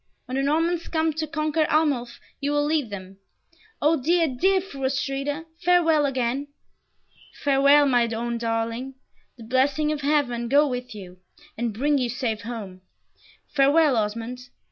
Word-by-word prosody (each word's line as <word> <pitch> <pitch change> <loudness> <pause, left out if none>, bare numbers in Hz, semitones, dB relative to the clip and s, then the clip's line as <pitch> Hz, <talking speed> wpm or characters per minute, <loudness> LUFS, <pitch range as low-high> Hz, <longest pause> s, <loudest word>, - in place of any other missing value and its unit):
When 255 - -5
the 270 - +1
Normans 325 +4 0
come 320 -1 0
to 315 +1 -3
conquer 310 0 0
Arnulf 285 -6 0 0.2
you 285 +1 -1
will 290 0 +2
lead 300 -5 0
them. 190 -1 -9 0.7
O 310 -1 +3
dear, 335 +4 +2
dear 375 +9 +2
Fru 355 -8 -9
Astrida, 275 +3 -2 0.2
farewell 325 -4 +4
again." 260 +1 -1 1.0
"Farewell, 280 +1 +5
my 245 -3 +3
own 235 +1 -3
darling. 230 +3 -3 0.4
The 235 - -11
blessing 270 +6 +1
of 300 -1 -3
Heaven 270 -5 0
go 290 +3 +5
with 250 -3 -5
you, 185 -3 -10 0.4
and 235 0 -2
bring 280 +7 +1
you 250 -2 -1
safe 230 -2 -2
home! 205 -5 -7 0.7
Farewell, 285 +1 +4
Osmond. 230 +3 -3
275 Hz, 145 wpm, -24 LUFS, 235-300 Hz, 1.0 s, Farewell